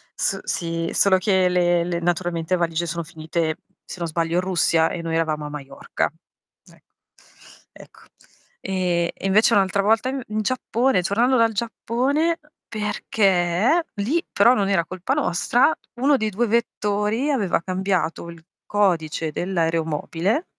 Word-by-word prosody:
s - - -1
sì, 165 -1 -3
solo 190 -2 +4
che 185 -1 +2
le 175 -1 +2
le 175 -1 -2
naturalmente 175 0 -1
valigie 170 -1 -1
sono 170 0 -3
finite, 160 0 -3 0.3
se - - -8
non 170 - -2
sbaglio, 165 +1 -1
in 180 - +3
Russia 170 -3 +2
e 170 - -4
noi 165 -1 -3
eravamo 155 -2 -1
a - - -5
Maiorca. 140 -2 -4 0.6
Ecco. - - -24 0.8
Ecco. - - -16 0.6
E 180 -3 -1
e - - -5
invece 215 +4 +4
un'altra 195 0 +2
volta 225 +4 +2
in 270 0 -4
in 215 0 -2
Giappone, 250 -2 +1
tornando 235 +8 +2
dal 230 -1 +3
Giappone, 260 - -1 0.3
perché 210 - +1
lì 255 +12 0
però 235 +5 +5
non 200 -3 0
era 180 -4 +2
colpa 185 +9 -2
nostra, 255 - +2 0.2
1 275 +4 +3
dei 220 -4 -1
2 225 +4 0
vettori 215 +2 0
aveva 210 - +1
cambiato 185 -2 -2
il 170 -1 -12 0.3
codice 165 -6 0
dell'aeromobile 165 - -1
185 Hz, 145 wpm, -22 LUFS, 170-220 Hz, 0.8 s, però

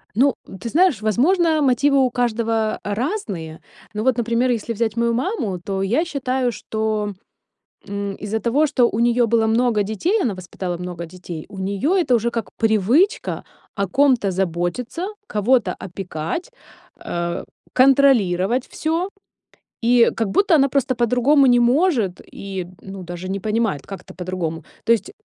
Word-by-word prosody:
Ну, 270 +3 +4
ты 190 +4 -7
знаешь, 330 - +3
возможно, 315 - +2
мотивы 275 +1 +3
у 255 - +2
каждого 230 -2 0
разные, 205 - -3 0.3
но 215 +1 -3
вот, 255 -2 +2
например, 235 +2 +1
если 230 0 -2
взять 225 0 -1
мою 235 0 +2
маму, 235 - -2
то 195 +2 -3
я 245 - +1
считаю, 260 -5 -1
что, 215 -1 -2 0.7
м, 200 -1 -4
из-за 210 +1 -3
того, 270 +8 +2
что 250 -4 +3
у 215 - -3
неё 240 +1 +3
было 225 0 +2
много 225 -1 +2
детей, 330 - 0
она 240 - 0
воспитала 180 -1 -5
много 175 -1 -6
детей, 170 -2 -8
у 195 - -11
неё 200 - 0
это 330 -9 +2
уже 235 +1 +1
как 230 -1 -3
привычка- 225 - +2 0.3
о 200 -2 -1
ком-то 250 -3 +3
заботиться, 190 - -2 0.2
кого-то 215 -2 +2
опекать, 180 - -5 0.5
э, 170 0 -3 0.3
контролировать 255 -5 +4
всё, 325 +3 -1 0.8
и 240 0 +5
как 225 - 0
будто 380 - +3
она 275 -2 +4
просто 260 -2 0
по-другому 250 +4 +3
не 245 -1 +5
может 240 - +2
и, 190 -3 -5
ну, 195 -1 -8
даже 175 +1 -7
не 195 - -2
понимает, 215 -7 -1
как 195 - -7
это- - - -12
по-другому. 175 -3 -4 0.2
То - - +3
есть 230 - -2
230 Hz, 150 wpm, -21 LUFS, 195-260 Hz, 0.8 s, и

